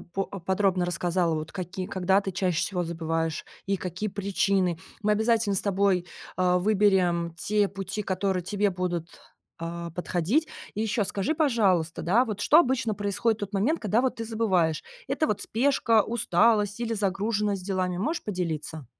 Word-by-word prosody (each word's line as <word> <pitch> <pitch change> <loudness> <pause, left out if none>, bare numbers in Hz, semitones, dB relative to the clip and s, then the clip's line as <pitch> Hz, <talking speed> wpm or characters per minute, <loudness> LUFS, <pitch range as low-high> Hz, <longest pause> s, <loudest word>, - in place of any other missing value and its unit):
по 195 0 0
подробно 190 0 0
рассказала, 175 -1 0
вот, 155 0 -4
какие 185 0 -5
когда 190 +1 +2
ты 195 - -4
чаще 180 -2 0
всего 180 -3 -1
забываешь 165 -1 -2 0.2
и 195 0 +1
какие 185 +4 -4
причины. 195 -3 0 0.2
Мы 210 +1 +3
обязательно 220 -1 +2
с - - +1
тобой, 195 -3 +1 0.3
э, 180 -1 +3
выберем 185 -4 +2
те 205 +1 +1
пути, 195 +2 -5
которые 190 -1 -1
тебе 205 +3 0
будут, 175 -2 -3 0.5
а, 170 0 -5
подходить. 180 - 0 0.3
И 215 - -1
еще 215 -1 0
скажи, 205 +12 -1
пожалуйста, 200 - +2
да, 225 +9 +3
вот, 210 -2 -4
что 305 - +6
обычно 260 -7 +2
происходит 205 +3 0
в - - -14
тот 200 - -14
момент, 255 +12 +1
когда, 215 +3 +1
вот, 260 - 0
ты 230 - -4
забываешь: 190 -8 +1 0.3
это, 310 - +1
вот, 210 - -1
спешка, 230 -3 +2
усталость 215 -1 +2
или 230 -1 -1
загруженность 205 -1 -1
делами? 185 -2 -1
Можешь 305 - -2
поделиться? 160 - -4
195 Hz, 160 wpm, -27 LUFS, 180-215 Hz, 0.5 s, что